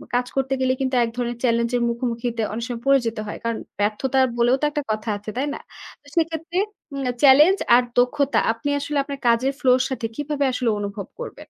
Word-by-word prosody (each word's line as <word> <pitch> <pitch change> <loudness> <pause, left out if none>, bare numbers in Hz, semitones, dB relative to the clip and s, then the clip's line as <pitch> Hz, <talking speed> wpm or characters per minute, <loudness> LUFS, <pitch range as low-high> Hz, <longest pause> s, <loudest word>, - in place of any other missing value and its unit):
কাজ 245 0 +1
করতে 270 0 0
গেলে 255 0 +2
কিন্তু 260 -1 0
এক 230 - -1
ধরনের 240 -1 -2
চ্যালেঞ্জ 235 -1 +2
এর - - -1
মুখোমুখিতে 235 -1 -2
অনেক 230 +2 -4
সময় 235 -2 -5
পড়ে 275 0 +5
যেত 230 0 -2
হয়। - - -5
কারণ 230 -1 -1 0.2
ব্যর্থতা 220 +6 0 0.2
বলেও 240 +2 +4
তো - - +2
একটা 295 -1 -2
কথা 215 +1 -3
আছে, 210 +1 -9
তাই 280 +3 0
না? - - -7 0.4
তো 290 - -23
সেক্ষেত্রে 330 +1 -1 0.4
উম 275 -1 -3 0.2
challenge 300 +8 +7 0.2
আর 250 - +5
দক্ষতা 275 +3 +2
আপনি 230 +5 -4
আসলে 285 +1 -3
আপনার 280 -1 -7
কাজের 250 +4 +3
ফ্লো 255 -2 +3
এর 255 - 0
সাথে 255 -3 -3
কিভাবে 290 -1 -1
আসলে 245 -2 0
অনুভব 200 -1 -5
করবেন? - - -7
255 Hz, 210 wpm, -22 LUFS, 230-280 Hz, 0.4 s, challenge